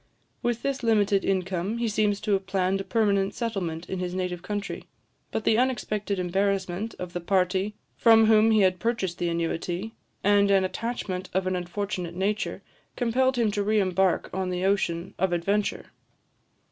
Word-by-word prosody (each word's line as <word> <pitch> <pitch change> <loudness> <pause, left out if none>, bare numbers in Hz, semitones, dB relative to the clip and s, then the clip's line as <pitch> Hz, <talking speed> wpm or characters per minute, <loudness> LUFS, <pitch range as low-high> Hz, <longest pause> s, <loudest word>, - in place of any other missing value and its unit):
With 240 -1 -1
this 275 -1 -1
limited 210 -4 +2
income, 190 +2 -1
he 235 0 0
seems 210 -1 +1
to 215 - -2
have 195 -1 +1
planned 190 0 0
a - - -5
permanent 200 -3 +1
settlement 180 -8 -3
in 190 - -4
his 180 0 -3
native 180 -2 -2
country; 205 +1 -4 0.4
but 220 - -3
the 220 - +3
unexpected 215 -5 -1
embarrassment 190 +2 -1
of 180 -1 -6
the 175 - -3
party 190 +3 +1 0.2
from 225 -1 +6
whom 220 0 +5
he 215 -1 +4
had 185 -1 +3
purchased 195 -4 -1
the 175 - 0
annuity, 170 +5 -2 0.3
and 200 0 +4
an 195 -1 +4
attachment 190 -2 -3
of 190 0 +1
an 185 0 0
unfortunate 180 -1 -4
nature, 205 +3 -2 0.3
compelled 260 +2 +1
him 225 -3 +2
to 205 - -1
re 215 +1 +2
embark 190 -1 +1
on 190 -1 -1
the 180 +1 -1
ocean 190 -3 0
of 185 -1 +1
adventure. 200 +5 -1
195 Hz, 170 wpm, -26 LUFS, 180-215 Hz, 0.4 s, from